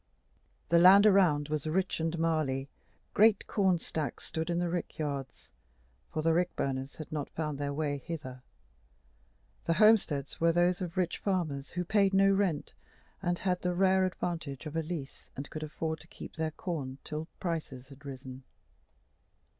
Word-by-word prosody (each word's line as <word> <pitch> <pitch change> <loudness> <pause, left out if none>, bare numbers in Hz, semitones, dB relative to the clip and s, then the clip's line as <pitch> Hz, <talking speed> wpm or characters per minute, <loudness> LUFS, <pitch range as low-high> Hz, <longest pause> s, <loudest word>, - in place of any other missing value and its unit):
The 170 - +5
land 190 +4 +8
around 175 -8 +4
was 155 0 -2
rich 180 +3 0
and 165 +1 -1
marly, 155 -5 0 0.5
great 215 -1 +5
corn 190 -4 +2
stacks 155 -2 -4
stood 160 +1 -3
in 170 - 0
the 175 0 +1
rick 175 -1 -3
yards 140 -4 -5 0.6
for 155 - -2
the 165 0 +3
rick 180 +1 +1
burners 135 0 -2
had 155 - -9
not 150 -2 -3
found 150 -3 -3
their 145 0 -1
way 145 -1 -1
hither; 130 -4 -7 1.2
the 165 - +2
homesteads 185 -10 +3
were 165 0 +5
those 175 +2 +2
of 180 0 -5
rich 180 -2 0
farmers 155 -8 -1
who 180 0 -3
paid 195 0 +3
no 195 0 +5
rent, 195 -7 0 0.5
or 175 - +1
had 180 -2 0
the 180 0 -1
rare 190 +1 +4
advantage 170 -6 -3
of 155 +1 -6
a 165 - +1
lease, 155 -4 -6
and 140 - -7
could 155 - -5
afford 160 +1 -3
to - - -15
keep - - -10
the 160 -1 -1
corn 150 -5 -4
till 155 +1 -5
prices 150 -7 -4
had 140 +1 -14
risen. 130 -1 -8
160 Hz, 170 wpm, -31 LUFS, 145-180 Hz, 1.2 s, land